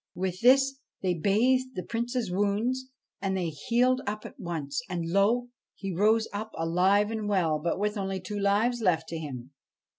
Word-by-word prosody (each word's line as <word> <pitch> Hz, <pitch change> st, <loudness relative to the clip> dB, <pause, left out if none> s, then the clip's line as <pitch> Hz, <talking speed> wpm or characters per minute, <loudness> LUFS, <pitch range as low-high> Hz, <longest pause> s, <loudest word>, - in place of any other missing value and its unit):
With 185 Hz, 0 st, -3 dB
this 270 Hz, +2 st, +5 dB, 0.2 s
they 185 Hz, -1 st, +2 dB
bathed 250 Hz, +9 st, +2 dB
the 180 Hz, -, -3 dB
Prince's 235 Hz, 0 st, -2 dB
wounds, 210 Hz, +7 st, 0 dB, 0.4 s
and 190 Hz, -1 st, 0 dB
they 175 Hz, -3 st, -1 dB
healed 245 Hz, -, +1 dB
up 210 Hz, +1 st, -3 dB
at -, -, -10 dB
once; 160 Hz, -, -3 dB
and 175 Hz, -2 st, -2 dB
lo, 225 Hz, +6 st, +2 dB, 0.3 s
he 195 Hz, -2 st, -5 dB
rose 215 Hz, +5 st, +3 dB
up 215 Hz, +2 st, -5 dB
alive 185 Hz, +6 st, +2 dB
and 215 Hz, -2 st, -3 dB
well, 165 Hz, -6 st, +2 dB
but 170 Hz, +3 st, -1 dB
with 210 Hz, +1 st, -1 dB
only 195 Hz, -1 st, -2 dB
two 205 Hz, +3 st, -5 dB
lives 215 Hz, +5 st, +2 dB
left 165 Hz, -5 st, +1 dB
to 165 Hz, -, -4 dB
him. 130 Hz, -4 st, -7 dB
200 Hz, 175 wpm, -28 LUFS, 180-230 Hz, 0.4 s, this